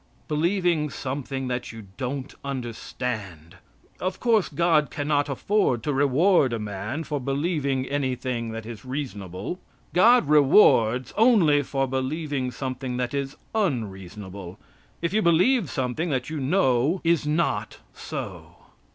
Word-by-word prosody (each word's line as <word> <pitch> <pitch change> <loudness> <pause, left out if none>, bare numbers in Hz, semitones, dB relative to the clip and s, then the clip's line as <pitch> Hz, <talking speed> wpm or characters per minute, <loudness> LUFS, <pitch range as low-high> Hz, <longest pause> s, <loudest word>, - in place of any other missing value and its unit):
Believing 170 0 +1
something 135 -1 -4
that 125 0 -3
you 115 -2 -10
don't 130 +1 -4
understand. 115 - -5 0.4
Of 185 0 -3
course 225 -5 +2
God 155 -1 +2
cannot 145 -1 0
afford 140 - +1
to 150 - -1
reward 140 +1 +3
a - - 0
man 105 +8 -4
for 150 -2 -3
believing 140 -1 -1
anything 130 -4 -2
that 115 0 -6
is 110 -2 -8
reasonable. 130 - -5 0.3
God 230 - +5
rewards 130 - +5
only 205 -11 +5
for 135 0 -1
believing 135 +1 -2
something 130 -1 -4
that 125 0 -2
is 140 0 -3 0.2
unreasonable, 100 - -3 0.5
if 170 +2 0
you 215 - +3
believe 185 - +3
something 130 +6 -2
that 130 0 -2
you 155 - -3
know 140 +1 +2
is 165 -3 +2
not 150 -10 0 0.2
so. - - -7
135 Hz, 125 wpm, -25 LUFS, 125-160 Hz, 0.5 s, God